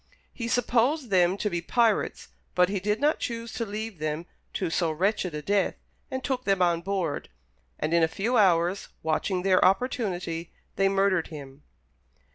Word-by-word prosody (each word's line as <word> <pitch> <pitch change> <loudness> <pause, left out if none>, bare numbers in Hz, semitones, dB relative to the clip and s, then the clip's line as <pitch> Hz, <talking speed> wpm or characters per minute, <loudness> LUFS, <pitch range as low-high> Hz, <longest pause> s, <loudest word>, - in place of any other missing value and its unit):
He 235 - -4
supposed 245 +2 +1
them 180 0 +4
to 210 - -1
be 175 -4 -1
pirates, 230 +5 +1 0.3
but 180 0 +4
he 200 -1 -1
did 210 +3 0
not 295 +2 +2
choose 230 -1 -4
to 230 - -3
leave 210 -2 -5
them 155 +2 -2 0.3
to 180 -4 -2
so 170 -1 +1
wretched 180 0 0
a 150 - -5
death, 200 +3 +1 0.3
and 260 0 -4
took 255 -1 -1
them 195 -4 +2
on 170 -2 +2
board; 185 -5 -2 0.5
and 155 - -1
in 170 - +4
a 160 - +5
few 210 +9 -1
hours, 180 -2 +3 0.2
watching 180 +4 0
their 185 -1 +4
opportunity, 185 -6 0 0.2
they 195 0 +3
murdered 195 -3 +2
him. 140 -3 -10
195 Hz, 170 wpm, -27 LUFS, 170-220 Hz, 0.5 s, a